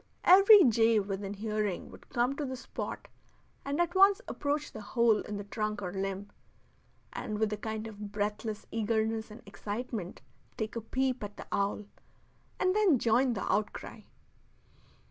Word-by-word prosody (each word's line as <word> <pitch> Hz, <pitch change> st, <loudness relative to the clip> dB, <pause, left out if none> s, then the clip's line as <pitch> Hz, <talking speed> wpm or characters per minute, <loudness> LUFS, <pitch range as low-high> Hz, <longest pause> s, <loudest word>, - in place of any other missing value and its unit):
Every 395 Hz, +2 st, +9 dB
jay 225 Hz, -3 st, +4 dB
within 195 Hz, 0 st, -4 dB
hearing 210 Hz, -2 st, -2 dB
would -, -, -15 dB
come 245 Hz, +3 st, +1 dB
to 300 Hz, -, -2 dB
the 260 Hz, -2 st, -3 dB
spot 255 Hz, -, -6 dB, 0.6 s
and 285 Hz, +3 st, -2 dB
at 345 Hz, 0 st, +1 dB
once 390 Hz, +1 st, +6 dB
approach 295 Hz, +1 st, -2 dB
the 215 Hz, -, -8 dB
hole 225 Hz, +1 st, +3 dB
in 210 Hz, -, -5 dB
the 205 Hz, -, -5 dB
trunk 210 Hz, +1 st, -3 dB
or 180 Hz, -1 st, -4 dB
limb, 195 Hz, +1 st, -4 dB, 0.8 s
and 210 Hz, -, -4 dB
with 215 Hz, 0 st, 0 dB
a -, -, -2 dB
kind 220 Hz, +1 st, -4 dB
of 210 Hz, -2 st, -8 dB
breathless 210 Hz, +1 st, -3 dB
eagerness 220 Hz, 0 st, -1 dB
and 215 Hz, +2 st, -12 dB
excitement 205 Hz, -1 st, -5 dB, 0.3 s
take 220 Hz, 0 st, -3 dB
a 230 Hz, -, -2 dB
peep 255 Hz, +2 st, -1 dB
at 205 Hz, 0 st, -7 dB
the -, -, -8 dB
owl, 200 Hz, +1 st, -1 dB, 0.7 s
and 370 Hz, +1 st, +2 dB
then 405 Hz, -9 st, +4 dB
join 240 Hz, +2 st, +2 dB
the 195 Hz, -, -3 dB
outcry. 210 Hz, 0 st, -3 dB
220 Hz, 160 wpm, -30 LUFS, 205-255 Hz, 0.8 s, Every